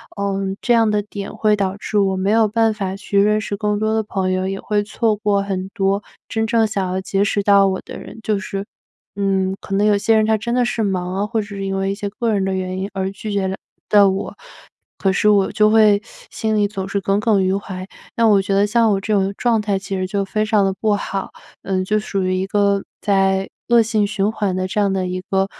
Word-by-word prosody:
呃， 200 -1 -1 0.2
这 240 - +2
样 225 -2 +4
的 210 0 +1
点 200 -1 -7
会 215 -1 +2
导 195 -1 -1
致 210 - -3
我 195 -1 +2
没 190 +2 0
有 225 0 +4
办 225 +1 +2
法 195 -2 -3
去 200 0 -1
认 210 +1 +3
识 200 -1 -4
更 210 -1 0
多 215 +1 0
的 220 - +2
朋 190 -2 -2
友， 185 0 0
也 195 0 -3
会 210 -1 0
错 215 +1 0
过 205 -2 +1
很 190 -1 -3
多 195 -1 +1 0.3
真 220 0 -1
正 225 -1 +3
想 200 -3 -2
要 190 +1 -2
结 195 +1 0
识 205 0 0
到 200 -1 +5
我 190 0 -2
的 - - -9
人， - - -11
就 210 -2 0
是 200 -1 -5 0.5
嗯， 190 -1 0
可 195 - -4
能 205 +2 +2
有 210 -1 +4
些 220 +2 +2
人 215 - +3
他 220 0 +2
真 235 +3 -2
的 250 - +3
是 235 -1 -1
忙 185 -3 -1
啊， 200 - 0
或 225 -1 -1
者 205 - -8
是 200 -1 -5
因 195 - -2
为 195 0 0
一 - - -3
些 205 -1 -4
个 230 +2 -2
人 195 -2 +1
的 195 - -1
原 185 0 -3
因 195 - -3
而 190 0 -2
拒 210 +2 -6
绝 195 -1 0
了 190 - -2 0.3
到 205 -1 +6
我， 190 +1 -3 0.6
可 195 - +1
是 210 - +3
我 200 -2 +3
就 215 0 +3
会 215 -2 +5 0.3
心 220 -1 -1
里 205 -1 +2
总 195 -2 -5
是 200 - -1
耿 195 +1 +1
耿 210 -3 +2
于 185 +1 +1
怀， 190 -2 -6 0.3
那 230 -1 +3
我 200 -2 +5
觉 195 +1 -2
得 200 +1 +4
像 225 0 +3
我 195 - +1
这 215 +1 -1
种 195 -1 +2
状 235 -3 +2
态 205 -2 0
其 195 0 -5
实 185 - -1
就 200 0 -1
非 215 +2 -1
常 215 -2 +2
的 195 - 0
不 215 -2 +2
好， 195 -1 -4 0.3
呃， 190 -1 -1
就 215 +3 +1
属 195 -2 -2
于 185 0 0
一 190 +1 -1
个 200 -1 +1 0.2
在 195 -1 +1 0.2
恶 235 -1 +6
性 215 -2 +1
循 205 0 0
环 205 -4 -1
的 185 0 -1
这 210 - -2
样 200 -1 +2
的 190 -1 -1
一 185 0 -3
个， 195 0 +2
200 Hz, 275 characters per minute, -20 LUFS, 195-215 Hz, 0.6 s, 到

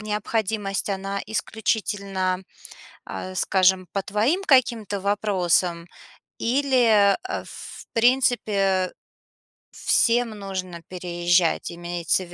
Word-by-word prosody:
необходимость, 210 -1 -2
она 195 +1 -3
исключительно, 200 -4 -2 0.6
а, 185 0 -6
скажем, 185 -1 +2
по 195 - 0
твоим 230 - 0
каким-то 235 - +2
вопросам? 185 -4 0 0.5
Или, 235 -6 +3
э, - - -3
в - - -10
принципе, 215 -6 +2 0.8
всем 235 -2 +2
нужно 185 -4 -6
переезжать? 175 -1 0
Имеется 175 +1 -1
в 175 - -14
200 Hz, 90 wpm, -24 LUFS, 185-220 Hz, 0.8 s, Или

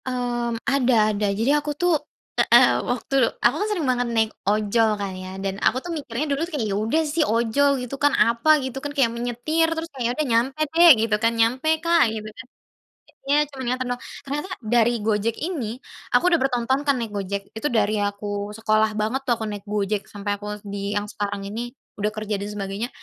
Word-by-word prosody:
Mmm, 240 -2 -2
ada 245 -6 +3
ada. 205 0 0
Jadi 220 +7 +1
aku 295 0 0
tuh, 355 +1 +2 0.5
eee, - - +5
waktu - - -3 0.2
aku 245 - +3
kan 415 - 0
sering 365 -8 -1
banget 245 -1 +1
naik 225 -1 +1 0.2
ojol 215 +2 +2
kan 200 -2 -4
ya 185 0 -8
dan 195 +1 -4
aku 245 - +3
tuh 350 - -5
mikirnya 285 -3 -3
dulu 280 - -2
tuh 340 +1 -3
kayak 225 -5 -1
ya - - 0
udah 310 +9 +2
sih 305 +2 0
ojol 235 +2 +2 0.2
gitu 250 - -6
kan 290 -1 +4
apa 235 +6 +2 0.2
gitu 260 0 -5
kan, 290 - -4
kayak 235 -4 +3
menyetir 245 +8 0
terus 325 0 -3
kayak 255 -3 -4
ya - - +1
udah 305 - +1
nyampe 265 +6 +1
dek 340 +1 +8
gitu 215 -2 +1
kan, 230 0 +3
nyampe 250 +7 +2 0.2
kak 335 0 +4
gitu 215 -1 -5
kan. 230 +1 -11 0.8
Iya 285 - +4
cuman 265 -2 -7
nganter 255 +1 -1
doang, 245 - -6 0.2
ternyata 290 +6 -4 0.2
dari 235 +1 +3
Gojek 220 +1 0
ini, 285 - -3 0.4
aku - - +2
udah 340 - +5
bertahun-tahun 260 0 +1
kan 280 - +5
naik 230 -3 -4
Gojek, 200 0 -3
itu 225 +7 -2
dari 215 -4 +1
aku 205 0 -3 0.3
sekolah 215 -1 +2
banget 220 +5 -1
tuh - - +4
aku 220 - -5
naik 205 -2 -5
Gojek 205 0 -1
sampai 205 0 -5
aku 205 - -8 0.2
di 200 0 -4
yang 205 - 0
sekarang 205 -1 -4
ini 205 +3 -5 0.4
udah 210 - +1
kerja 215 -2 -3
dan 200 - -4
sebagainya, 205 +2 -4
230 Hz, 205 wpm, -23 LUFS, 210-275 Hz, 0.8 s, dek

